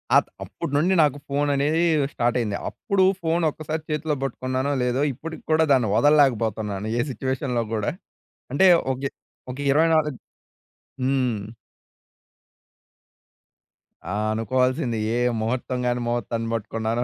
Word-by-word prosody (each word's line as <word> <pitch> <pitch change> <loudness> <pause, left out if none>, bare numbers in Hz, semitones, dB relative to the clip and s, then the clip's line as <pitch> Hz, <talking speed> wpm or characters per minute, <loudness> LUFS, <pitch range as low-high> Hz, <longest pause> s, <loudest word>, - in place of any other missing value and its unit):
ఆహ్, - - +5 0.2
అప్పుడు - - -6
నుండి 180 +6 +3
నాకు 145 -1 +1
ఫోననేదీ 145 +3 +1 0.3
స్టార్టయింది. 120 -3 0
అప్పుడు 195 -1 0 0.2
ఫోనొక్కసారి 160 -1 -1
చేతిలో 150 0 -1
బట్టుకున్నానో 130 +2 -2
లేదో, 125 +3 +1
ఇప్పటికి 160 +6 -8
కూడా 160 0 +4
దాన్ని 120 -6 +2
వదల్లేకబోతన్నాను, 110 -8 +2
ఏ - - +4
సిట్యుయేషన్‌లో 130 -2 -2
గూడా. 105 -2 0 0.6
అంటే 190 +6 +5 0.3
ఒగ్గే 135 +1 -4 0.4
ఒక 130 - -9
ఇరవై 160 +3 +4
నాలుగ్ 150 -5 0 0.9
హ్మ్. 130 -5 +1 2.7
ఆ! - - -2 0.2
అనుకోవాల్సింది. 125 +2 0 0.2
ఏ - - +1 0.2
ముహూర్తం 125 +2 -2
గాని, 120 0 0
ముహూర్తాన్ని 115 -1 -2
పట్టుకున్నానో 115 +1 -2
130 Hz, 110 wpm, -24 LUFS, 120-150 Hz, 2.7 s, ఆహ్